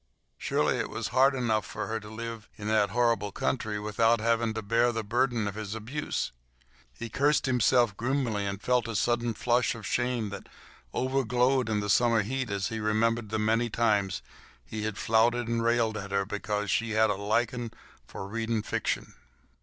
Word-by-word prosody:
Surely -, -, +1 dB
it -, -, -2 dB
was -, -, -4 dB
hard 135 Hz, +1 st, +4 dB
enough 110 Hz, -5 st, +1 dB
for 85 Hz, -, -5 dB
her 110 Hz, 0 st, -2 dB
to 105 Hz, -1 st, -11 dB
live 115 Hz, 0 st, -7 dB
in 105 Hz, -, -6 dB
that 110 Hz, -2 st, +3 dB
horrible 115 Hz, -2 st, +1 dB
country 105 Hz, +9 st, -2 dB
without 115 Hz, +2 st, +2 dB
having 115 Hz, 0 st, +1 dB
to 110 Hz, -, -3 dB
bear 115 Hz, +3 st, +3 dB
the 115 Hz, -1 st, -3 dB
burden 120 Hz, 0 st, +1 dB
of 100 Hz, -, -3 dB
his 105 Hz, 0 st, -5 dB
abuse. 125 Hz, +7 st, -3 dB, 0.7 s
He 115 Hz, -, -5 dB
cursed 145 Hz, +6 st, +2 dB
himself 125 Hz, -3 st, +3 dB
grimly, 120 Hz, -4 st, -1 dB
and 100 Hz, 0 st, -3 dB
felt 125 Hz, +1 st, +1 dB
a 115 Hz, -, -4 dB
sudden 120 Hz, +1 st, +1 dB
flush 120 Hz, +2 st, +1 dB
of 110 Hz, -3 st, -9 dB
shame 120 Hz, -1 st, 0 dB
that 100 Hz, 0 st, -8 dB, 0.4 s
over 130 Hz, -, 0 dB
glowed 125 Hz, +2 st, +2 dB
the 105 Hz, -2 st, -1 dB
summer 115 Hz, +1 st, +4 dB
heat 130 Hz, +3 st, -2 dB
as 100 Hz, -1 st, -1 dB
he 115 Hz, -, -4 dB
remembered 110 Hz, +1 st, +1 dB
the 110 Hz, -, -1 dB
many 115 Hz, +2 st, +1 dB
times 100 Hz, -6 st, +1 dB, 0.4 s
he 110 Hz, -1 st, -4 dB
had 110 Hz, -2 st, -3 dB
flouted 115 Hz, +1 st, +2 dB
and 115 Hz, 0 st, 0 dB
railed 115 Hz, -1 st, +2 dB
at 100 Hz, -1 st, -6 dB
her 100 Hz, 0 st, 0 dB
because 105 Hz, 0 st, -2 dB
she 115 Hz, -1 st, 0 dB
had 110 Hz, -1 st, +4 dB
a -, -, 0 dB
liking 115 Hz, +4 st, -1 dB, 0.4 s
for 95 Hz, -, -7 dB
reading 115 Hz, +1 st, -2 dB
fiction. -, -, -2 dB
115 Hz, 185 wpm, -28 LUFS, 105-120 Hz, 0.7 s, hard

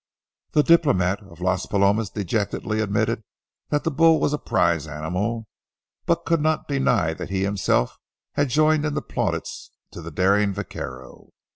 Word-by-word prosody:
The 150 Hz, -, +4 dB
diplomat 100 Hz, -, +3 dB
of 90 Hz, -4 st, -15 dB
Las 90 Hz, 0 st, 0 dB
Palomas 100 Hz, +1 st, +2 dB
dejectedly 105 Hz, +2 st, -2 dB
admitted 110 Hz, +2 st, 0 dB, 0.5 s
that 145 Hz, -1 st, 0 dB
the 165 Hz, -, 0 dB
bull 160 Hz, +2 st, +5 dB
was 145 Hz, -, +1 dB
a 150 Hz, -, -1 dB
prize 80 Hz, -3 st, +1 dB
animal, 90 Hz, +10 st, -3 dB, 0.6 s
but 170 Hz, 0 st, +1 dB
could 165 Hz, -2 st, +2 dB
not 155 Hz, +1 st, 0 dB
deny 120 Hz, -, +1 dB
that 80 Hz, -, -7 dB
he 95 Hz, 0 st, -1 dB
himself 100 Hz, -10 st, 0 dB, 0.3 s
had 145 Hz, -1 st, +1 dB
joined 155 Hz, +3 st, +3 dB
in 150 Hz, -1 st, -1 dB
the -, -, -2 dB
plaudits -, -, -3 dB, 0.2 s
to -, -, -9 dB
the 85 Hz, -, -7 dB
daring 100 Hz, +4 st, +2 dB
vaquero. 65 Hz, -5 st, -8 dB
105 Hz, 155 wpm, -23 LUFS, 90-145 Hz, 0.6 s, bull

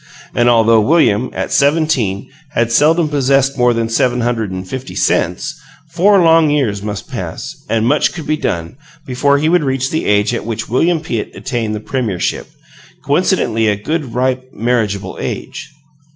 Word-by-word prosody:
And 120 Hz, 0 st, +3 dB
although 115 Hz, -1 st, +4 dB
William, 130 Hz, -3 st, +2 dB
at -, -, -4 dB
seventeen, 140 Hz, -9 st, +1 dB, 0.3 s
had 120 Hz, -4 st, 0 dB
seldom 155 Hz, +6 st, +3 dB
possessed 135 Hz, -1 st, +1 dB
more 125 Hz, -2 st, +3 dB
than 115 Hz, -1 st, -1 dB
seven 120 Hz, +2 st, +1 dB
hundred 115 Hz, -3 st, -1 dB
and 95 Hz, 0 st, -6 dB
fifty 130 Hz, +6 st, -7 dB
cents, 90 Hz, -, 0 dB, 0.4 s
four 190 Hz, +3 st, +4 dB
long 165 Hz, -1 st, +5 dB
years 125 Hz, -9 st, 0 dB
must 105 Hz, -1 st, -5 dB
pass, 125 Hz, -, -6 dB, 0.2 s
and 110 Hz, -1 st, +1 dB
much 145 Hz, +4 st, +2 dB
could 160 Hz, -3 st, -8 dB
be 155 Hz, -, 0 dB
done, 85 Hz, -, -3 dB, 0.3 s
before 140 Hz, +3 st, +1 dB
he 150 Hz, +2 st, 0 dB
would 175 Hz, -1 st, +3 dB
reach 130 Hz, -1 st, -1 dB
the 160 Hz, -, -1 dB
age 105 Hz, +2 st, +2 dB
at 120 Hz, -, -3 dB
which 110 Hz, 0 st, -4 dB
William 160 Hz, +8 st, +1 dB
Pitt 115 Hz, -9 st, -3 dB
attained 115 Hz, -5 st, -3 dB
the -, -, -4 dB
premiership 110 Hz, -5 st, -2 dB, 0.6 s
coincidentally 110 Hz, 0 st, +1 dB
a 105 Hz, -, +2 dB
good, 135 Hz, +4 st, -4 dB
ripe, 130 Hz, 0 st, -1 dB
marriageable 105 Hz, -5 st, -2 dB
age. -, -, -5 dB
125 Hz, 165 wpm, -16 LUFS, 110-145 Hz, 0.6 s, long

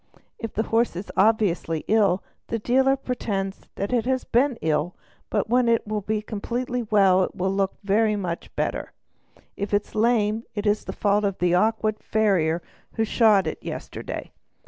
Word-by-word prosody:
If 225 Hz, -, -6 dB
the 220 Hz, -, +1 dB
horse 230 Hz, -2 st, +1 dB
is 185 Hz, +4 st, -6 dB
obviously 190 Hz, -6 st, +2 dB
ill, 200 Hz, -3 st, +3 dB, 0.2 s
the 230 Hz, -, -1 dB
dealer 265 Hz, +4 st, +3 dB
pretends 205 Hz, -7 st, -4 dB
that 200 Hz, +5 st, -3 dB
it 240 Hz, -2 st, +1 dB
has 260 Hz, -1 st, +1 dB
been 255 Hz, +1 st, +2 dB
ill 155 Hz, +2 st, 0 dB, 0.3 s
but -, -, 0 dB
when 245 Hz, +1 st, +3 dB
it 230 Hz, -1 st, +3 dB
is 215 Hz, 0 st, -2 dB
completely 245 Hz, +4 st, -3 dB
well 195 Hz, -4 st, +4 dB
it -, -, -2 dB
will 190 Hz, +1 st, -1 dB
look 195 Hz, -1 st, 0 dB
very 210 Hz, +2 st, +2 dB
much 180 Hz, -4 st, -4 dB
better; -, -, -2 dB, 0.6 s
if 200 Hz, +1 st, -1 dB
it 205 Hz, -, +1 dB
is -, -, -21 dB
lame, 220 Hz, -1 st, +2 dB
it 205 Hz, 0 st, -3 dB
is 210 Hz, 0 st, +1 dB
the -, -, -4 dB
fault 205 Hz, 0 st, +1 dB
of 200 Hz, -2 st, 0 dB
an 175 Hz, 0 st, +2 dB
awkward 215 Hz, +3 st, +1 dB
farrier 180 Hz, -7 st, +1 dB, 0.3 s
who 225 Hz, -, 0 dB
shod 215 Hz, -3 st, +4 dB
it -, -, -3 dB
badly -, -, -6 dB
yesterday. -, -, -6 dB
210 Hz, 175 wpm, -24 LUFS, 195-225 Hz, 0.6 s, well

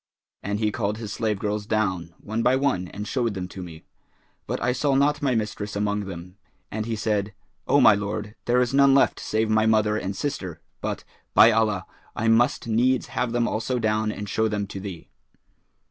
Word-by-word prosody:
And 100 Hz, +1 st, -2 dB
he 110 Hz, -1 st, +1 dB
called 105 Hz, -1 st, -2 dB
his 110 Hz, -3 st, -6 dB
slave 105 Hz, 0 st, -1 dB
girls 105 Hz, +1 st, -3 dB
down, 95 Hz, -6 st, -1 dB
one 110 Hz, +2 st, -3 dB
by 125 Hz, +2 st, +4 dB
one 130 Hz, -10 st, 0 dB
and 105 Hz, +4 st, -7 dB
showed 115 Hz, -2 st, -1 dB
them 90 Hz, -1 st, -4 dB
to 95 Hz, -, -8 dB
me; 80 Hz, -3 st, -9 dB, 0.6 s
but -, -, -2 dB
I 125 Hz, -, +1 dB
saw 135 Hz, +2 st, +1 dB
not 145 Hz, +2 st, +2 dB
my 135 Hz, -4 st, +1 dB
mistress 105 Hz, -1 st, -3 dB
among 105 Hz, 0 st, -1 dB
them, 90 Hz, 0 st, -9 dB, 0.3 s
and 110 Hz, +1 st, -3 dB
he 115 Hz, -, -1 dB
said, 105 Hz, -2 st, -1 dB, 0.3 s
'O 145 Hz, -, +4 dB
my 110 Hz, -, +8 dB
lord, 105 Hz, +1 st, -3 dB
there 120 Hz, +1 st, +3 dB
is 125 Hz, 0 st, +1 dB
none 140 Hz, 0 st, +6 dB
left 135 Hz, -, +3 dB
save 110 Hz, +1 st, 0 dB
my 110 Hz, 0 st, +3 dB
mother 110 Hz, -1 st, +3 dB
and 95 Hz, -1 st, -3 dB
sister; 95 Hz, -, -4 dB, 0.2 s
but, -, -, -3 dB, 0.3 s
by 115 Hz, -, +8 dB
Allah, 105 Hz, -4 st, +1 dB, 0.3 s
I 115 Hz, -, -1 dB
must 115 Hz, +2 st, +3 dB
needs 120 Hz, +3 st, +1 dB
have 125 Hz, -2 st, -1 dB
them 120 Hz, 0 st, +1 dB
also 115 Hz, +4 st, -1 dB
down 110 Hz, -1 st, 0 dB
and 105 Hz, -1 st, -6 dB
show 110 Hz, +3 st, +1 dB
them 105 Hz, -1 st, -2 dB
to 100 Hz, -, -6 dB
thee.' 95 Hz, -4 st, -8 dB
110 Hz, 200 wpm, -25 LUFS, 100-115 Hz, 0.6 s, my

